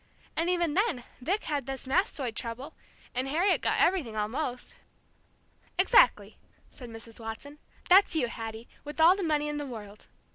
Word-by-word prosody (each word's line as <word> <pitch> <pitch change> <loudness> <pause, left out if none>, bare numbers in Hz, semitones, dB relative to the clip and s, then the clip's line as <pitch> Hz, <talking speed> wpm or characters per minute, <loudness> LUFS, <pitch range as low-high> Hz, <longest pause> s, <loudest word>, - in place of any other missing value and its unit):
And 330 +2 0
even 345 -4 +1
then 385 - +1 0.2
Vic 385 +11 -1
had 290 -4 -2
this 270 0 -5
mastoid 270 - 0
trouble, 250 +6 -5 0.4
and 255 +2 -1
Harriet 340 +8 +2
got - - +1
everything, 295 -13 +2
almost." 245 +4 -3 1.0
"Exactly," - - +4 0.3
said 245 -2 -11
Mrs. 225 0 -10
Watson. 230 +7 -8 0.3
"That's 370 -1 +6
you, 310 - +2
Hattie, 225 -1 -7 0.2
with 295 +2 -8
all 335 +3 +7
the 400 - -4
money 300 -4 +1
in 295 0 -3
the 290 -1 -4
world. 210 -4 -10
285 Hz, 155 wpm, -29 LUFS, 235-345 Hz, 1.0 s, all